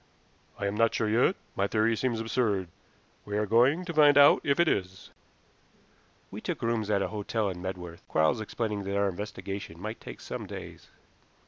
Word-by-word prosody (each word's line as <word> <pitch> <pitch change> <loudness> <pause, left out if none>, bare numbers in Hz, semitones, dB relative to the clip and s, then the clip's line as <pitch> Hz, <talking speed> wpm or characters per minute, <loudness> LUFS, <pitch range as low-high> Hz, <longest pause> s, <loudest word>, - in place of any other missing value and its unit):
"I - - -3
am 100 - -1
not 115 +1 +2
sure 110 - 0
yet. 120 - +3 0.2
My 100 - +1
theory 110 +2 +2
seems 120 -1 -1
absurd. 110 -5 0 0.5
We 105 0 -3
are 105 - +1
going 125 - +3
to 170 - -4
find 145 -2 +6
out 145 0 +7
if 140 +1 +1
it 170 - +4
is." 95 - -2 1.2
We - - -7
took - - -4
rooms 115 -2 0
at 100 -2 +2
a - - -2
hotel 105 0 -2
in 90 -2 -6
Medworth, 90 -2 -6
Quarles 80 +9 +2
explaining 105 -1 -3
that 100 +1 -2
our 100 0 +2
investigations 100 -2 -6
might 110 +5 -6
take - - -9
some - - -6
days. - - -9
105 Hz, 185 wpm, -28 LUFS, 100-115 Hz, 1.2 s, out